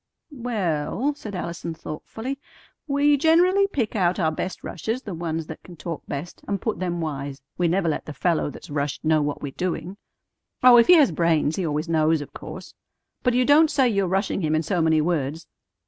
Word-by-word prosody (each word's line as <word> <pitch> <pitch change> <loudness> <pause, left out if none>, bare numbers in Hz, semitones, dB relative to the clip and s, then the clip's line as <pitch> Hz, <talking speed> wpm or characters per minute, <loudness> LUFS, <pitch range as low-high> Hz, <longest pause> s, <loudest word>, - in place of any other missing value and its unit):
"Well," 225 - -1
said 215 -8 -8
Allison 170 -1 -4
thoughtfully, 220 - -6 0.5
"we 285 0 +3
generally 355 +6 +4
pick 250 - -2
out 180 -2 +1
our 160 -3 +2
best 180 +4 -5
rushers, 225 - -4
the 200 - -6
ones 165 -1 -3
that 160 - -9
can 180 - -13
talk 165 -1 -5
best, 145 +5 -6
and 200 -1 -1
put 220 +2 -2
them 175 -2 -2
wise. 140 -3 -5 0.2
We 175 - +3
never 175 +1 +1
let 155 - -2
the 155 - -5
fellow 170 -1 0
that's 145 - -11
rushed 145 +1 -2
know 155 -1 +3
what 145 0 -3
we're 140 - -3
doing. 180 +3 -3 0.7
Oh, 250 -1 +9
if 235 - +6
he 360 - +9
has 295 - +5
brains, 160 -2 +1
he 185 -4 -1
always 150 +2 -2
knows, 160 -1 +2
of 145 - -9
course; - - -9 0.5
but 250 -2 +1
you 250 0 +3
don't 300 +3 +6
say 280 -4 +3
you're 200 -4 +1
rushing 195 +2 0
him 155 -1 +1
in 155 - +1
so 175 +2 0
many 160 -1 +3
words. 155 -1 -1
175 Hz, 200 wpm, -24 LUFS, 155-235 Hz, 0.7 s, Oh